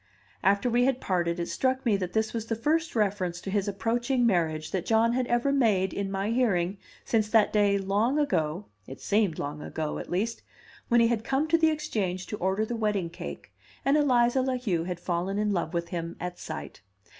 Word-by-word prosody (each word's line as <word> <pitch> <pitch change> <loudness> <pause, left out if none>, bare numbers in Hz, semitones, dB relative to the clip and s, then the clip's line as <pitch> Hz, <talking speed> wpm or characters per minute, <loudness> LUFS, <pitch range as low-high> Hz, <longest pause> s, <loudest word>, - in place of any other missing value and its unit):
After 200 +4 +2
we 245 +1 +3
had 265 -1 +1
parted 175 -4 -1
it 170 - -2
struck 260 0 0
me 225 -4 +3
that 185 -2 -3
this 220 0 0
was 225 -1 -3
the 225 - -1
first 315 +7 0
reference 190 -5 0
to 195 - -5
his 200 0 0
approaching 240 +5 0
marriage 160 -7 0
that 185 -3 -2
John 225 +1 +3
had 250 0 0
ever 240 +3 +1
made 210 -8 +2
in 200 -1 -2
my 195 +2 -1
hearing 195 -6 +1 0.3
since 215 -2 +1
that 220 -2 +4
day 205 -1 +3
long 205 +8 +1
ago 180 - 0 0.2
(it 130 - -9
seemed 205 -6 +1
long 145 +1 -4
ago, 155 -1 -4
at - - -8
least) 215 +6 -1 0.5
when 240 -1 +4
he 230 - +4
had 230 -2 0
come 270 +6 0
to 330 - +5
the 320 -1 +5
Exchange 210 - -2
to 210 - -5
order 190 +3 0
the 235 - -4
wedding 210 -6 -1
cake, - - -8 0.3
and 275 +2 +4
Eliza 255 -3 +3
La 260 0 0
Heu 185 -10 -1
had 180 -1 -4
fallen 180 +3 -2
in 210 0 +1
love 170 -3 -1
with 170 -1 -2
him 170 -1 -4
at 180 0 -5
sight. - - -7
210 Hz, 210 wpm, -27 LUFS, 180-240 Hz, 0.5 s, to